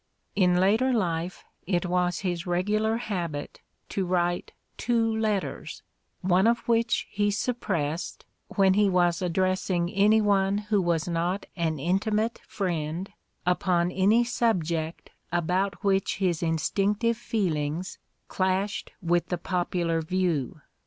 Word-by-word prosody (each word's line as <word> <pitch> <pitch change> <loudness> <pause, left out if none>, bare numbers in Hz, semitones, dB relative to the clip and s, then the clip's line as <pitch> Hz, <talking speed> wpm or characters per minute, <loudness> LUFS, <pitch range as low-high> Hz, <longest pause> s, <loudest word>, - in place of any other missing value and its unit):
In 180 -3 +4
later 220 +8 +3
life 175 -6 -1 0.2
it 180 -1 +1
was 180 -1 0
his 180 -1 -2
regular 210 +5 +1
habit 175 -11 -4 0.3
to 195 - -1
write 175 -1 0 0.2
two 225 -1 +1
letters, 215 -3 -2 0.4
one 185 +2 +3
of 235 +1 +1
which 230 0 +2
he 205 0 +1
suppressed, 185 -8 -2 0.2
when 195 -1 +3
he 205 0 +4
was 175 -2 +2
addressing 185 0 0
any 210 +3 +4
one 200 -1 +2
who 210 -1 +1
was 170 -2 0
not 175 +3 -1
an 165 -3 -1
intimate 210 +8 0
friend 175 -1 -3 0.3
upon 180 -1 +2
any 200 +6 +4
subject 170 -9 -1 0.2
about 180 +3 0
which 195 -1 +1
his 180 -5 0
instinctive 200 +7 +1
feelings 180 -7 -2 0.3
clashed 190 +2 -1
with 175 0 +1
the 180 - -1
popular 175 -2 -1
view. 160 -5 -1
185 Hz, 120 wpm, -27 LUFS, 175-205 Hz, 0.4 s, In